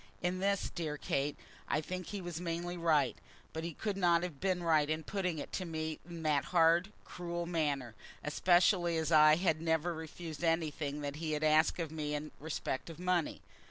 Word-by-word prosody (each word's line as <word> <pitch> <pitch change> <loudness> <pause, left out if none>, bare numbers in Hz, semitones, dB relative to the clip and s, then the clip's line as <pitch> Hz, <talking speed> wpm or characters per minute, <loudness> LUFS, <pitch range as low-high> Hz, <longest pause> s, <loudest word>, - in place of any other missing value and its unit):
In 180 +1 0
this, 200 0 0
dear 155 -3 -3
Kate, 140 0 -1 0.3
I 155 - +1
think 185 +3 -5
he 205 -2 -4
was 175 -1 -5
mainly 175 +1 -3
right. 155 -7 +2 0.4
But 160 - -4
he 170 0 -4
could 205 -3 -2
not 175 -2 +4
have 165 -6 -5
been 185 -2 0
right 155 -3 +3
in 155 0 -1
putting 180 -2 -2
it 145 - -6
to 185 - -1
me 160 -2 -3
in 170 -1 -7
that 150 -3 +2
hard, 170 +2 +4
cruel 175 -1 -4
manner, 145 -8 -1 0.3
especially 175 +2 +3
as 160 0 -1
I 155 -1 +8
had 165 -2 +1
never 165 +1 +1
refused 160 0 -7
anything 155 -3 0
that 145 0 -4
he 155 -1 -2
had 150 0 -1
asked 155 +1 +4
of 165 -3 -2
me 150 -2 -2
in 150 +1 -5
respect 150 -2 -3
of 165 - -8
money. 180 -2 0
165 Hz, 195 wpm, -34 LUFS, 155-175 Hz, 0.4 s, I